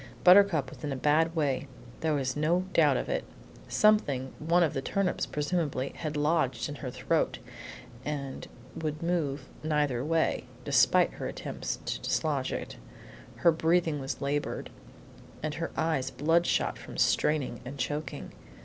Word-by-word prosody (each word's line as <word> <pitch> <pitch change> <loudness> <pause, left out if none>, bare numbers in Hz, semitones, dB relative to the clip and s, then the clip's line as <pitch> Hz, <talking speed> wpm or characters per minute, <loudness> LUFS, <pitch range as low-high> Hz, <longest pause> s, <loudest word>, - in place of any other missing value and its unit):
Buttercup 180 -7 +6
was - - -13
in 145 - -2
a - - -1
bad 155 +5 +2
way; 145 -3 0 0.3
there 160 -2 +1
was 130 -2 -1
no 160 +4 +2
doubt 145 -5 +5
of - - -3
it. - - -1 0.4
Something, 145 -12 +2
one 170 +3 +3
of 160 - +1
the 135 - -2
turnips, 190 +5 -1
presumably, 150 -3 -1
had 155 -2 -4
lodged 150 -3 +1
in 145 - -5
her 130 -2 -6
throat, 125 0 0 0.7
and 140 -3 -4 0.3
would 155 0 -3
move 150 -6 -1 0.2
neither 145 -5 +1
way, 160 -3 +1 0.2
despite 145 +6 +4
her - - -5
attempts - - -4
to - - -2
dislodge - - 0
it. - - -5 0.6
Her 170 - +4
breathing 160 -1 +1
was 135 +2 -4
labored, 145 +1 -2 0.7
and 155 -1 -1
her 165 +3 -3
eyes 155 -5 0
bloodshot 165 +5 +1
from - - -9
straining 145 -6 +1
and 135 +3 -7
choking. 145 +1 -4
150 Hz, 150 wpm, -29 LUFS, 135-165 Hz, 0.7 s, Buttercup